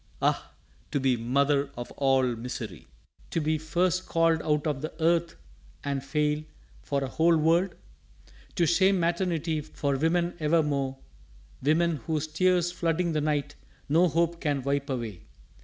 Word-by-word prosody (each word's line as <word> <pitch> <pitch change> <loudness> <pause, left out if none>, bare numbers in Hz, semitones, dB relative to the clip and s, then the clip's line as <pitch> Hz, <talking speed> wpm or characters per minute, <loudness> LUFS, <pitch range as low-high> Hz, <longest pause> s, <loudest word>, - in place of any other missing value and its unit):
Ah, - - 0 0.4
to 145 - 0
be 130 -1 +2
mother 140 +4 +1
of 120 - -6
all 135 -1 +2
misery! 115 - -7 0.4
To - - -1
be 155 0 0
first 175 +4 0
called 165 -1 +2
out 150 -1 0
of 145 -4 -1
the 155 - -4
earth 170 +1 +2 0.5
and 140 -1 -2
fail 150 +2 0 0.4
For 140 - -1
a - - -2
whole 165 +5 +3
world! 170 +4 +2 0.8
To 175 - +3
shame 190 +3 +3
maternity 170 -2 0
For 140 -1 -2
women 170 +4 +1
evermore 150 -4 +1 0.6
women 160 +4 +2
whose 150 +4 -2
tears 175 +2 +2
Flooding 170 0 0
the 155 - +1
night, 145 -1 -1 0.3
no 165 +5 +4
hope 170 +1 0
can 145 -4 0
wipe 140 +1 -1
away! 115 -8 -5
155 Hz, 145 wpm, -27 LUFS, 140-170 Hz, 0.8 s, no